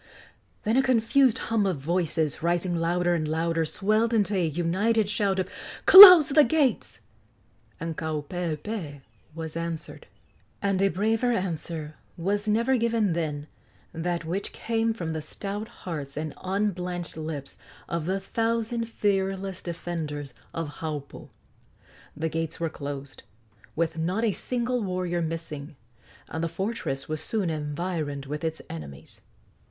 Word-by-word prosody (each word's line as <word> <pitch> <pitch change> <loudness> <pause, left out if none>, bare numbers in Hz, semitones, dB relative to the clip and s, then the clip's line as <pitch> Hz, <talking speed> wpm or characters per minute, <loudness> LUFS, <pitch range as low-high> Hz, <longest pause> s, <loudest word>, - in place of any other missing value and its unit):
Then 225 +3 +1
a - - +6
confused 255 0 +3
hum 220 -5 0
of 185 -5 0
voices, 160 0 0
rising 175 +1 0
louder 175 +1 +1
and 155 -3 -1
louder, 165 +1 0
swelled 215 +7 +1
into 205 -1 +2
a 180 -3 +2
united 190 +8 +1
shout 200 -2 +1
of 185 -1 0 0.4
"Close 365 -6 +12
the 300 +1 +6
gates!" 290 0 +1 0.8
and 165 -1 -4
Kaupeepee 160 +1 -4 0.3
was 160 -1 -5
answered. 165 -1 -5 0.5
And 195 -2 0
a 195 - +4
braver 220 +6 +1
answer 165 -6 -3 0.2
was 205 +5 -1
never 235 +5 +2
given 225 -5 +1
than 150 -3 -2 0.5
that 170 0 -2
which 185 +5 -3
came 225 0 0
from 170 -8 -4
the 160 - -3
stout 205 +6 -5
hearts 155 -11 -7
and 155 -1 -3
unblanched 180 -3 -2
lips 155 -3 -6 0.3
of 170 -1 -3
the 190 +1 0
thousand 230 +3 -1
fearless 195 -3 -1
defenders 160 -5 -5 0.2
of 160 -3 -5
Haupu. 150 -3 -6 0.9
The 160 +1 -1
gates 165 0 -3
were 165 -1 -1
closed, 140 -2 -7 0.5
with 165 0 -1
not 185 +7 0
a 225 - +3
single 245 +3 -2
warrior 180 -3 -1
missing, 160 -2 -5 0.5
and 160 - -4
the 165 - 0
fortress 190 -6 -3
was 155 -1 -3
soon 200 -7 -1
environed 150 -1 -3
with 150 +3 -5
its 160 0 -3
enemies. 75 -4 -8
175 Hz, 135 wpm, -26 LUFS, 160-210 Hz, 0.9 s, Close